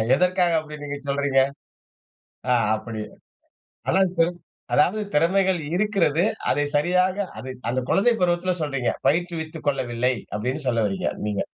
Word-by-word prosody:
எதற்காக 180 +2 +2
அப்படி 150 -1 -8
நீங்க 145 0 -4
சொல்றீங்க? 140 -1 +2 1.1
ஆ - - +6 0.2
அப்படி 110 0 -6 0.9
அதாது 180 -3 +3 0.5
அதாவது 195 +3 +3
திறமைகள் 185 +3 +3 0.2
இருக்கிறது, 185 -5 +2 0.3
அதை 145 - +2
சரியாக 180 +5 +2 0.2
அதை 130 0 -6 0.2
அந்த 130 - 0
குழந்தை 235 +5 +4
பருவத்தில 180 +1 +2
சொல்றீங்க, 135 -5 -1 0.2
பயிற்றுவித்துக் 160 +1 -1
கொள்ளவில்லை, 125 -2 +1 0.2
அப்படினு 125 +8 -2
சொல்ல 115 -2 +2
வறீங்க 95 - -2 0.2
நீங்க 100 -2 -1
160 Hz, 120 wpm, -24 LUFS, 130-180 Hz, 1.1 s, ஆ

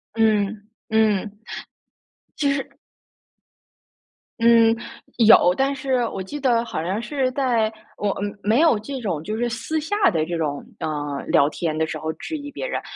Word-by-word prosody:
嗯， 210 -2 +1 0.2
嗯， 215 -2 +1 1.0
其 285 -2 +2
实 275 -1 -3 1.7
嗯， 230 -1 +5 0.4
有。 220 -6 +7
但 275 +1 +1
是 260 -2 0
我 195 - -5
记 290 +10 -6
得， 245 -4 +2
好 160 - -4
像 190 +5 -1
是 265 0 -1
在 240 -5 +1 0.3
我 205 - -1
嗯 205 +1 -4
没 220 +5 +3
有 315 -9 +4
这 265 +5 -6
种 170 -9 -2
就 215 +5 -3
是 240 +1 0
私 240 +7 -2
下 400 - +2
的 160 -6 0
这 175 - -3
种， 145 -3 -2 0.2
呃 145 -2 -3
聊 140 - +4
天 155 0 -3
的 160 - +1
时 155 - -5
候 155 +1 -2
质 315 - -6
疑 290 -1 -7
别 - - -5
人。 - - -3
220 Hz, 175 characters per minute, -22 LUFS, 185-260 Hz, 1.7 s, 有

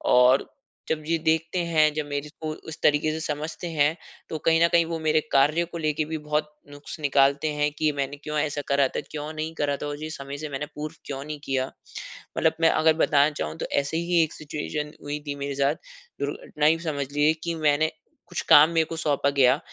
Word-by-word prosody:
और 125 +2 +5 0.4
जब 155 -1 -1
ये 165 0 +2
देखते 160 +3 +1
हैं, 155 -2 +3
जब 155 0 -2
मेरे 145 0 -4
को 155 - -3 0.2
उस 160 - -7
तरीके 150 +1 +3
से 160 - -3
समझते 155 +2 -4
हैं 150 0 +2 0.3
तो 160 - -3
कहीं 165 0 +4
न - - +6
कहीं 170 -1 +5
वो 165 0 -3
मेरे 155 0 +2
कार्य 150 +5 +4
को 170 0 -8
लेके 155 -1 0
भी 160 +1 -4
बहुत 150 0 -1 0.2
नुक्स 145 +3 -9
निकालते 140 +1 +3
हैं 150 0 +2
कि 155 -1 +3
मैंने 140 +1 -2
क्यों 150 0 -3
ऐसा 145 0 -1
करा 140 -1 +4
था? - - -3
क्यों 150 0 -5
नहीं 155 +1 -4
करा 145 -2 0
था - - -3
और 145 +1 -5
ये 155 - -4
समय 140 -1 -6
से 155 +1 -5
मैंने 140 +1 -3
पूर्व 155 +2 -5
क्यों 135 -1 -5
नहीं 150 0 -6
किया?" 130 -1 0 0.7
मतलब - - +3
मैं 165 - +6
अगर 160 0 +4
बताना 145 0 +4
चाहूँ 80 - -4
तो - - -3 0.2
ऐसे 145 +3 -3
ही 170 0 +2
एक 155 - -4
सिचुएशन 150 0 -5
हुई 145 +1 -3
थी 145 - -2
मेरे 140 0 -4
साथ, 140 +2 +2 0.5
दुर्घटना 150 -1 -2
ही 160 +2 +4
समझ 150 -5 -3
लीजिए 145 +2 +3
कि 170 -1 -2
मैंने 155 0 +2 0.4
कुछ - - -3
काम 150 +2 +9
मेरे 165 -1 +2
को 165 - -6
सौंपा 145 -3 +1
गया, 135 -1 +4
150 Hz, 220 wpm, -25 LUFS, 145-160 Hz, 0.7 s, काम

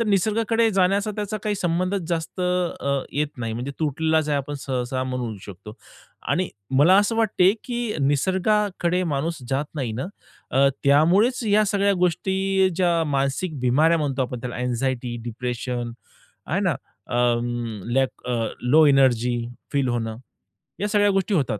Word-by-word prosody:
तर - - +2
निसर्गाकडे 220 +3 +2
जाण्याचा 195 +2 +2
त्याचा 210 0 -3
काही 210 -1 0
संबंधच 185 +2 -1
जास्त, 170 +1 -3
अ, 180 -6 0
येत 150 +1 0
नाही, 115 -2 -3
म्हणजे 125 +5 -4
तुटलेलाच 160 +1 +1
आहे 145 - +1
आपण 140 +1 -5
सहसा 130 -1 -2
म्हणू 125 -4 -3
शकतो. 100 +2 -10 0.5
आणि 185 0 +1 0.3
मला 175 +6 +6
असं 205 +2 +1
वाटतं, 210 -5 +4
की 240 -3 -3
निसर्गाकडे 185 +5 +1
माणूस 160 +5 -2
जात 135 +2 0
नाही 130 -7 -2
ना, 130 +8 -3 0.4
अ, 135 +1 +4 0.2
त्यामुळेच 180 - +4
या 210 +1 +4
सगळ्या 200 0 +2
गोष्टी, 190 +2 +1
ज्या 175 -2 +2
मानसिक 140 +3 -1
बिमाऱ्या 150 +7 +3
म्हणतो 140 -3 -1
आपण, 125 -1 -4
त्याला 125 0 -5
अँक्झायटी, 125 0 -2
डिप्रेशन 120 0 -4 0.6
आहे - - 0
ना? - - +1 0.3
अ, - - -2 0.8
लॅक 130 -1 0 0.4
लो 150 +6 +5
एनर्जी 125 -3 +3 0.4
फील 140 -2 +1
होणं, 115 -2 -2 0.6
या 205 - 0
सगळ्या 205 -1 +3
गोष्टी 195 +1 0
होतात. 130 - 0
155 Hz, 145 wpm, -23 LUFS, 130-190 Hz, 0.8 s, मला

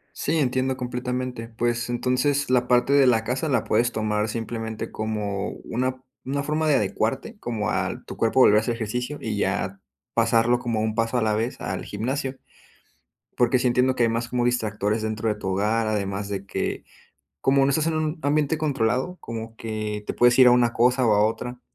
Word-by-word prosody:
Sí, 165 - -1
entiendo 130 -1 0
completamente. 125 -1 -4
Pues, 120 +1 -1
entonces 130 +3 0
la 125 -1 +3
parte 125 +3 +3
de 140 -2 +6
la 115 -3 +3
casa 130 +6 -2
la 125 -5 +2
puedes 120 +2 +1
tomar 105 0 -1
simplemente 115 -1 -4
como 105 -2 -3 0.2
una, 130 +2 -2 0.2
¿una 140 +2 -2
forma 155 +2 0
de 145 - +4
adecuarte?, 130 - -1
como 105 -3 -2
a - - -2
tu - - -8
cuerpo 115 +3 +2
volver 105 -2 +7
a - - +6
hacer 115 +1 -2
ejercicio 125 +6 -3
y 110 -2 -3
ya, 95 0 -1 0.3
pasarlo 115 +1 +3
como 115 -3 -1
un 110 0 -1
paso 115 +2 0
a 115 - +1
la 110 -1 +1
vez 115 +3 -2
al - - -4
gimnasio. 130 +6 -3 1.0
Porque 120 +1 +3
sí 125 - +1
entiendo 125 +1 +2
que 120 - +2
hay 115 - +3
más 115 +1 -2
como 120 -1 0
distractores 110 -3 0
dentro 110 0 -2
de 105 - 0
tu 95 -2 -5
hogar, 110 +4 +1
además 100 -1 -2
de 100 -1 -4
que, - - -3 0.6
como 135 0 +3
no 140 - +2
estás 155 +3 +1
en 165 - 0
un 155 +1 -1
ambiente 150 +1 +1
controlado, 135 +3 0
como 115 -1 -7
que 110 -2 -4
te - - -3
puedes 120 +1 +4
ir 125 -1 +9
a - - +6
una 120 -1 +4
cosa 125 +1 +3
o 110 - +4
a 105 +1 +4
otra. 125 +2 -4
120 Hz, 200 wpm, -24 LUFS, 110-130 Hz, 1.0 s, ir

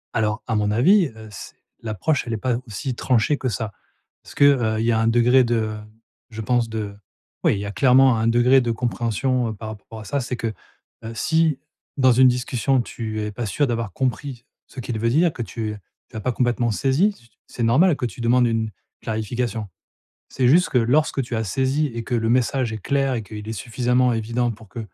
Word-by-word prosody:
Alors, 110 -1 0
à 115 - -2
mon 105 -1 +1
avis, 175 - +4
heu, 110 0 -11
c 100 - -9 0.3
l'approche 115 - -1
elle 120 - -4
est - - -1
pas 125 +2 -1
aussi 125 +4 -4
tranchée 125 +4 +1
que 130 - -2
ça. 110 0 -3 0.5
Parce - - -14
que, - - +3
heu, 115 -6 +3
y 115 +1 +2
a 110 - +2
un 115 - +1
degré 120 +3 +4
de, 120 0 0
heu, 110 -1 -2 0.5
je 110 -1 -7
pense 120 +1 +1
de 105 -2 -4 0.5
oui, - - +4
il - - -4
y 100 - -4
a 100 - -4
clairement 130 +2 +5
un 110 +1 0
degré 120 +3 +4
de 120 -2 -1
compréhension 120 +1 -1
par 110 +1 -7
rapport 110 +1 -10
à 110 - -10
ça, 140 +7 -1
c'est 125 0 -4
que, 115 -1 -3 0.5
heu, 115 +1 -6
si, 160 +2 +1 0.4
dans 130 -2 +5
une 130 +2 +6
discussion, 125 +1 +1
tu 110 -2 -5
es 105 0 -3
pas 115 +3 -4
sûr 145 +8 +1
d'avoir 115 -4 -2
compris 130 +1 -3 0.2
ce 135 - -11
qu'il 120 -2 -4
veut 115 +2 +1
dire, 160 +5 +3
que - - -6
tu 110 -2 -4 0.4
as 110 - -5
pas 125 - 0
complètement 120 -1 0
saisi, 135 - 0 0.2
c'est 120 - -5
normal 150 +10 +4
que - - -2
tu 120 - -6
demandes 120 +1 +3
une 115 -1 -1 0.3
clarification. 110 0 -3 0.6
C'est 125 -2 +1
juste 175 +7 +4
que 130 - +3
lorsque 135 +4 +2
tu 120 -1 -4
as 110 - -1
saisi 135 +8 0
et 115 -2 -6
que 120 - -3
le 115 -1 +1
message 125 0 +1
est 110 - -4
clair 135 +5 0
et 115 - -2
qu'il 105 0 -9
est - - -3
suffisamment 125 +2 +1
évident 115 +2 -1
pour 110 -1 -10
que, 115 - -7
120 Hz, 215 wpm, -22 LUFS, 110-130 Hz, 0.6 s, une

